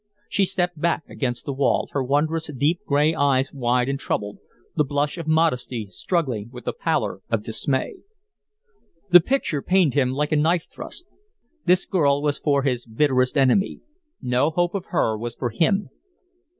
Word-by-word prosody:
She 200 - +1
stepped 180 -3 -1
back 170 -1 +1
against 125 -1 -3
the 140 - -3
wall, 135 +1 +1
her 140 - -1
wondrous, 155 +4 0
deep, 155 +7 +2
gray 150 +2 +3
eyes 140 -3 +1
wide 125 -2 +1
and 135 0 -2
troubled, 105 -6 -3 0.4
the 150 - +3
blush 145 +1 -1
of 165 - -6
modesty 130 -9 0
struggling 120 - -2
with 125 -1 -11
the - - -1
pallor - - -1
of 115 -3 0
dismay. 130 - -2 1.1
The 175 - +10
picture 175 - -1
pained 180 -6 +3
him 130 -3 +2
like 150 +3 -1
a - - +3
knife 165 +3 +2
thrust. 350 - -8 0.6
This 180 +1 +4
girl 145 -5 +2
was 145 -1 0
for 140 -2 +1
his 125 -3 0
bitterest 130 +3 +1
enemy 135 +9 +2 0.4
no 125 +3 +1
hope 175 +2 0
of 195 -3 -3
her 115 - 0
was 115 +2 -5
for 120 -2 -3
him. 195 - +1
145 Hz, 165 wpm, -23 LUFS, 125-165 Hz, 1.1 s, The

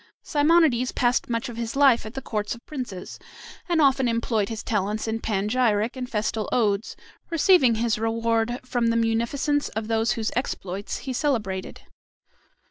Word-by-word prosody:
Simonides 295 -5 +3
passed 245 0 +1
much 230 +2 -1
of 240 -2 -8
his 230 +1 -4
life 270 -5 +4
at 220 - -10
the 270 - -5
courts 210 -1 -3
of 235 - -17
princes, 250 -11 -7 0.5
and 340 -2 +2
often 270 -3 +4
employed 230 -3 0
his 225 -1 -5
talents 210 +1 -1
in 225 0 -1
panegyric 215 +2 0
and 250 -1 -5
festal 215 -2 -2
odes, 210 -3 0 0.3
receiving 330 -7 +4
his 225 -1 0
reward 230 +1 0
from 245 -2 0
the 230 0 +2
munificence 235 +6 0
of 220 0 -4
those 225 0 +2
whose 220 -2 -2
exploits 200 -6 -3
he 265 - -3
celebrated. 220 -9 -2
230 Hz, 155 wpm, -25 LUFS, 220-255 Hz, 0.5 s, life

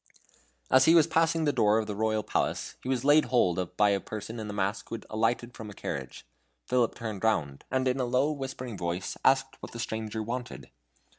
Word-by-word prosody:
As 130 0 +6
he 165 - +6
was 165 - +7
passing 165 0 +2
the 145 - +2
door 105 +1 +3
of 110 - 0
the 105 - -4
royal 110 0 0
palace, - - -1
he 130 - -6
was 130 -1 0
laid 150 +2 +6
hold 95 -9 +2
of 90 0 -4
by 105 -1 +5
a 100 - +2
person 110 +3 -7
in 110 -1 -5
a - - -3
mask 100 +1 -2
who - - -3
had 110 - -9
alighted 115 +2 0
from 110 -1 -8
a 105 - -10
carriage. - - -6 0.4
Philip 125 -2 +1
turned 110 -4 -5
round, 80 -11 0
and 130 0 0
in 130 +1 +1
a 125 - +1
low 130 +5 +2
whispering 130 -6 -5
voice 85 +1 -3
asked 135 0 +3
what - - -9
the 120 - -7
stranger 110 -1 -3
wanted. 120 +2 -6
115 Hz, 220 wpm, -29 LUFS, 105-130 Hz, 0.4 s, was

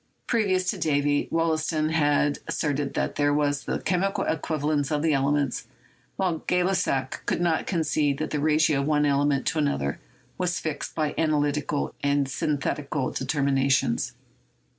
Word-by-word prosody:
Previous 190 -5 +1
to 200 - -7
Davy, 145 -2 +1
Wollaston 160 -1 0
had 145 -2 +2
asserted 145 -2 -1
that - - -1
these 145 - +2
were 145 0 +2 0.3
the - - -12
chemical 195 +2 +1
equivalents 150 -2 -1
of 150 0 0
the 160 -2 +3
elements, 140 -3 0 0.5
while 180 -4 0
Gay 180 0 +2
Lussac 165 -8 0
would - - 0
only 165 -2 +1
concede 155 -5 0
that 155 - -3
the 150 - -1
ratio 155 -1 +3
of 140 - -2
one 150 -1 +3
ele 140 0 +2
ment 140 -2 +1
to 160 - 0
another 70 - -1 0.4
was 180 -1 0
fixed 155 -3 -4
by 155 -2 0
analytical 150 -2 0
and 140 -1 +1
synthetical 140 0 -2
determinations. 135 -2 +1
150 Hz, 150 wpm, -26 LUFS, 140-160 Hz, 0.5 s, the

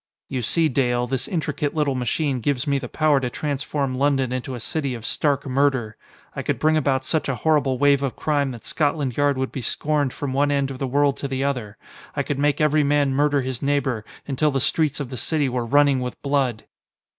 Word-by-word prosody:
You 130 -2 -2
see, 160 +8 +2
Dale, 125 -3 +1
this 125 0 -2
intricate 150 -3 -2
little 150 -3 +1
machine 130 +2 -1
gives 140 +2 -1
me 140 -2 +1
the 125 -3 -7
power 155 -3 +3
to 125 -2 -2
transform 140 0 -2
London 135 -1 +1
into 130 0 -4
a - - -6
city 140 +1 -2
of 115 -2 -8
stark 140 +2 0
murder. 130 -5 +1 0.4
I - - -2
could - - -1
bring 155 0 +2
about 135 -3 +1
such 160 -3 -1
a 135 - 0
horrible 145 -3 +1
wave 140 0 +4
of 135 -3 -2
crime 145 -3 0
that 120 -3 -9
Scotland 145 -5 0
Yard 145 -1 +2
would 130 0 -2
be 135 - -5
scorned 145 +3 0
from 135 0 -4
one 145 +2 +2
end 140 -1 0
of 130 - -7
the 135 - -1
world 140 +1 +2
to 140 - -4
the 135 0 -2
other. 125 -7 -2 0.4
I 140 - 0
could 140 0 -3
make 145 0 +2
every 150 0 +3
man 145 -1 +2
murder 145 0 +2
his 130 -2 -4
neighbor, 135 -5 0 0.2
until 145 +2 +1
the 135 -1 0
streets 150 +2 +1
of 140 -3 -5
the 130 - -5
city 145 +4 0
were 125 -2 -2
running 145 +1 +4
with 125 -1 -5
blood!" 135 -6 0
140 Hz, 220 wpm, -23 LUFS, 130-145 Hz, 0.4 s, wave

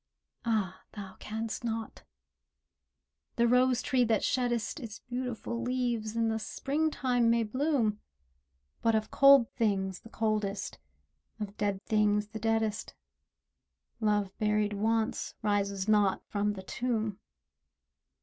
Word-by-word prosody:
ah, 210 -5 0
thou 195 -3 -8
can'st 220 +2 -4
not! 225 -1 -4 1.3
the 235 -1 +3
rose 250 +1 +3
tree 260 -3 +2
that 225 -3 +1
sheddest 245 +2 0
Its 225 -5 -7
beautiful 245 -1 -4
leaves, 240 -3 -1
in 230 0 +2
the 220 0 0
Springtime 270 -2 0
may 230 0 +3
bloom, 235 -2 0 0.8
But 225 -1 +3
of 215 0 -1
cold 275 -4 +7
things 190 -4 0
the 225 - -14
coldest, 215 -3 -2 0.6
of 205 -1 -5
dead 200 -2 -2
things 210 -1 +2
the 220 0 -6
deadest, 225 -1 -1 1.0
Love 210 -3 +1
buried 210 -1 +1
once, 220 +2 0
rises 200 -2 0
not 205 -3 +3
from 205 0 -1
the 190 -2 -8
tomb. 220 -1 -2
220 Hz, 120 wpm, -30 LUFS, 210-235 Hz, 1.3 s, cold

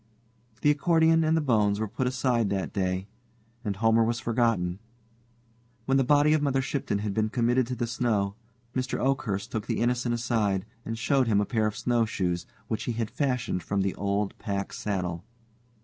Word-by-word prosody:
The 150 - +5
accordion 165 +2 +3
and 160 +1 +3
the - - +2
bones 105 -7 +2
were 110 - -1
put 125 +5 -2
aside 125 -4 +1
that 95 -1 -2
day, 95 -1 -1 0.6
and 105 -3 -2
Homer 115 +2 +3
was 115 +1 0
forgotten. 115 -7 0 1.1
When 135 +2 +3
the 135 - +4
body 145 +3 +4
of 155 - +2
Mother 140 -2 +1
Shipton 135 -5 -1
had 100 - -1
been 110 0 +1
committed 120 +1 +2
to 125 - -3
the 120 0 -1
snow, 110 -4 0 0.4
Mr. 130 +1 -1
Oakhurst 120 -6 -1
took 110 -2 -3
the - - -1
Innocent 120 0 +1
aside, 110 -5 0 0.2
and 115 0 -3
showed 130 +2 +2
him 105 -3 +3
a 105 - +1
pair 110 -2 +1
of 105 - -4
snowshoes, 95 -7 0 0.2
which 110 -1 -3
he 120 - -1
had 115 -1 -3
fashioned 125 -9 -1
from 100 +4 -1
the 95 -1 0
old 100 +1 -1
pack 100 -1 -3
saddle. 90 -5 -3
115 Hz, 180 wpm, -27 LUFS, 100-130 Hz, 1.1 s, The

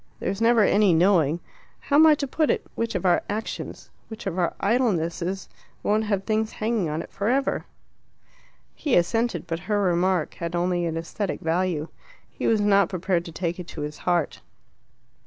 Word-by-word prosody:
There's 195 +3 -3
never 230 -1 +5
any 200 -3 +4
knowing 170 -3 +3 0.4
(how 285 - +1
am 320 +1 +8
I 305 - +7
to 285 - -3
put 310 +3 0
it?) - - 0
which 230 -2 -2
of 185 - -2
our 175 -1 +4
actions, 215 +2 -5 0.2
which 220 +1 -9
of 190 -2 -2
our 175 - 0
idlenesses 195 -5 0 0.4
won't 215 +1 +1
have 200 -2 -1
things 220 +1 -1
hanging 215 -6 -1
on 155 +2 -2
it - - -14
for 200 +2 -1
ever." 270 +2 0 1.1
He 290 - 0
assented, 225 +5 +1
but 165 -1 -3
her 210 -1 +2
remark 180 -2 +1
had 170 0 -5
only 175 0 0
an 165 0 -3
aesthetic 180 +4 -3
value. 165 -1 -1 0.4
He - - -4
was 220 -2 +3
not 200 -2 +4
prepared 185 -2 -1
to 165 - -8
take 175 +1 -3
it 175 - -7
to 155 - -7
his 150 0 -5
heart. 175 -3 0
190 Hz, 180 wpm, -25 LUFS, 170-215 Hz, 1.1 s, am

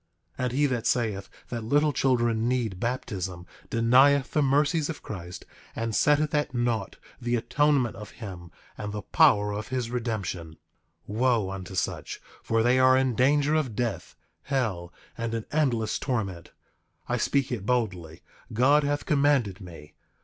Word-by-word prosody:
8:20 - - -1
And 125 - 0
he 145 +3 +2
that 125 -5 -1
saith 105 -5 0 0.2
that 120 -2 -4
little 145 +6 +2
children 120 -4 +1
need 120 -7 -1
baptism 95 -7 -3 0.2
denieth 130 +4 +4
the 150 - +2
mercies 145 +3 +2
of 160 - -6
Christ, 90 -3 -8 0.3
and 115 -1 -2
setteth 150 +4 +3
at 150 -3 0
naught 120 -5 -1 0.3
the 120 0 0
atonement 140 +1 +1
of 105 -2 -9
him 95 -7 -8 0.3
and 105 -1 -5
the 105 -1 -5
power 105 0 +4
of 105 +1 -5
his 125 -3 -3
redemption. 100 -9 -3 0.5
8:21 105 - -5
Wo 120 -6 +2
unto 95 -1 -7
such, 90 - -3 0.2
for 115 0 +1
they 125 +2 +3
are 130 0 +6
in 130 -1 +1
danger 145 +5 +3
of 145 -8 0
death, 115 -6 -3 0.3
hell, 105 -11 -2 0.2
and 115 0 -3
an 115 - -4
endless 125 -8 0
torment. 100 -10 -3 0.6
I 125 - 0
speak 135 +3 0
it 110 -5 -4
boldly; 95 -9 -1 0.3
God 135 +7 +4
hath 145 0 -1
commanded 140 - +2
me. 80 -5 -12
120 Hz, 155 wpm, -27 LUFS, 105-135 Hz, 0.6 s, are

